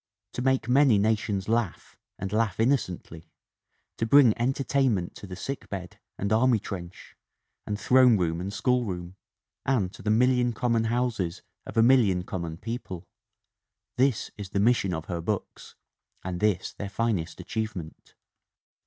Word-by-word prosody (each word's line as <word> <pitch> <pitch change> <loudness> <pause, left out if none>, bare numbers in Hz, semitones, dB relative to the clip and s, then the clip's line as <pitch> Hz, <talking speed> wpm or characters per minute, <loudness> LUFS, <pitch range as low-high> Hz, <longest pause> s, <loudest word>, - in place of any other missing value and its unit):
To - - -3
make 130 -2 +1
many 130 -3 +5
nations 105 -2 0
laugh 115 -4 -1 0.2
and 95 +2 -5
laugh 110 -3 +1
inno 115 +5 +4
cently; 90 - -5 0.7
to 115 - 0
bring 130 -3 +6
entertainment 130 -5 0
to 100 - -10
the 90 - -7
sickbed 95 -5 -6 0.2
and 100 +2 -1
army 120 +1 +4
trench 95 -4 -8 0.5
and 105 0 -2
throne 125 -2 +5
room 85 -2 -1
and 95 +2 -4
schoolroom; 100 -8 -1 0.5
and 110 -9 0
to - - -12
the 105 - -2
million 125 +2 +3
common 115 -1 +1
houses 115 -7 -1 0.2
of - - -7
a 115 - +6
million 115 -8 +4
common 85 -3 -5
people 95 -5 -6 0.9
this 130 -3 +1
is 100 -2 -6
the 100 - -1
mission 105 -3 +3
of 80 -2 -4
her 85 -3 -4
books 100 +3 -4 0.5
and 90 -1 -4
this 105 -4 0
their 100 - -6
finest 100 -6 -2
achievement." 110 -8 -6
105 Hz, 145 wpm, -27 LUFS, 95-120 Hz, 0.9 s, bring